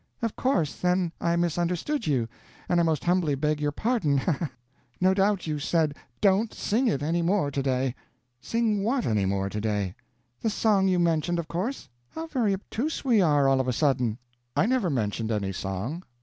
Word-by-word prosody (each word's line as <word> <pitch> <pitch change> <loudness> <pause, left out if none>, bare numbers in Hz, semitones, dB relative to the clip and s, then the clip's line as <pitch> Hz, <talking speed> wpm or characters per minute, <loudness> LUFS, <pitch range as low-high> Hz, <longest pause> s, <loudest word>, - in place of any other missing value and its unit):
Of 230 - -1
course, 180 - 0
then, 180 -1 +1
I 170 0 +2
misunderstood 175 - -1
you, 130 -6 +1 0.4
and 175 - +2
I - - +4
most 160 -3 +1
humbly 175 -5 +2
beg 150 +2 0
your 145 0 +1
pardon, 180 - +1
ha 135 - +1
ha 165 +3 -1
ha! 140 - -7 0.5
No 185 +1 +4
doubt 195 0 +1
you 155 -2 -2
said, 155 0 +1 0.3
'Don't 200 +3 +3
sing 245 +5 +1
it 145 - 0
any 165 +3 +1
more 170 -4 +1
to 140 - -1
day.'" 130 -1 0 0.5
"Sing 220 - 0
what 245 +3 +1
any 105 -3 +1
more 95 0 0
to 105 +1 -4
day?" 105 -4 -1 0.5
"The 225 - +1
song 205 -3 +2
you 185 -1 +2
mentioned, 170 0 +1
of 170 -2 -3
course, 190 - -3 0.2
How 320 - -6
very 255 -10 0
obtuse 255 +10 -4
we 235 -6 +4
are, 145 -5 +4
all 135 -1 +4
of 130 - -4
a 125 - +1
sudden!" 125 -5 +1 0.4
"I - - +3
never 240 -6 +1
mentioned 110 -4 -1
any 100 -3 -1
song." 95 - -4
170 Hz, 195 wpm, -27 LUFS, 135-200 Hz, 0.5 s, I